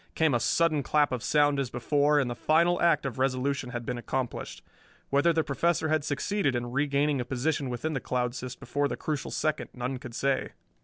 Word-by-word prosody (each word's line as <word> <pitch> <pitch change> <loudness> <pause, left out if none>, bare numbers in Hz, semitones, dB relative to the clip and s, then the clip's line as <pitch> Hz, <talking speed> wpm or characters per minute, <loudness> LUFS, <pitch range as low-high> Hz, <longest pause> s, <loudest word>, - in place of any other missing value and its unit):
Came 160 -3 +3
a 120 - +3
sudden 155 +2 +2
clap 145 +2 +2
of 125 -2 -2
sound 145 +1 +3
as 135 -3 -1
before, 145 +5 +2
and 135 - +1
the 120 - -2
final 170 +7 +2
act 165 -3 +3
of 130 -2 -4
resolution 130 0 0
had 120 -1 -5
been 125 0 -3
accomplished. 130 0 -4 0.5
Whether 140 +5 +4
the 160 -1 +1
Professor 160 +3 0
had 155 -1 +1
succeeded 145 +1 0
in 120 0 -3
regaining 140 0 +1
a - - -1
position 135 +3 -1
within 140 +6 -3
the 135 - -1
cloud 125 -1 -1
cyst 125 0 -7
before 145 +4 -1
the - - -4
crucial 150 -3 -3
second 155 -1 -1
none 125 +1 -3
could 125 -4 -9
say. 135 -1 0
140 Hz, 205 wpm, -28 LUFS, 125-155 Hz, 0.5 s, Whether